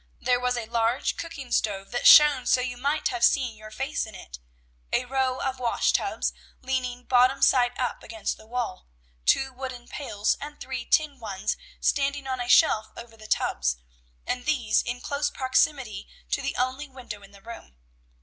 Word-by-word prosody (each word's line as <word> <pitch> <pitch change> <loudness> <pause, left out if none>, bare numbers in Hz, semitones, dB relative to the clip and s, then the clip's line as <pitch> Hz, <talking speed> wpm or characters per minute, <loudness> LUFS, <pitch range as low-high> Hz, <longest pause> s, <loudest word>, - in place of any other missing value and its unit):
There 250 -1 +2
was 250 0 0
a 235 - -3
large 230 +3 0
cooking 275 -7 -7
stove 195 -2 -1
that 245 - +2
shone 295 -4 +8
so - - +4
you 250 0 -3
might 285 +5 0
have 240 -2 -3
seen 250 -4 +3
your 215 0 -11
face 270 +4 -3
in 215 - -11
it, - - -10 0.5
a 250 - +1
row 260 0 0
of 265 -1 -3
wash 240 -2 +1
tubs, - - 0 0.3
leaning 250 -1 -2
bottom 255 +2 +3
side 245 -1 +4
up 250 - -2
against 220 -2 -4
the 220 - -17
wall, 235 -5 -4 0.4
two 265 -1 +3
wooden 255 -2 -7
pails 215 -8 -1
and 295 +1 -8
three 260 -2 -5
tin 295 -3 +1
ones, 210 -2 -3 0.2
standing 280 0 0
on 260 -1 -3
a 245 - -4
shelf 220 -6 +5
over 235 -1 -10
the 215 -1 -13
tubs, 60 - 0 0.5
and 250 +3 -3
these 255 -8 +2
in 245 +1 -5
close 285 +2 -1
proximity 260 -5 0 0.2
to - - 0
the - - -3
only 255 +4 -1
window 245 -6 -9
in 200 - -15
the 200 -1 -17
room. 230 - -11
250 Hz, 180 wpm, -26 LUFS, 225-265 Hz, 0.5 s, shone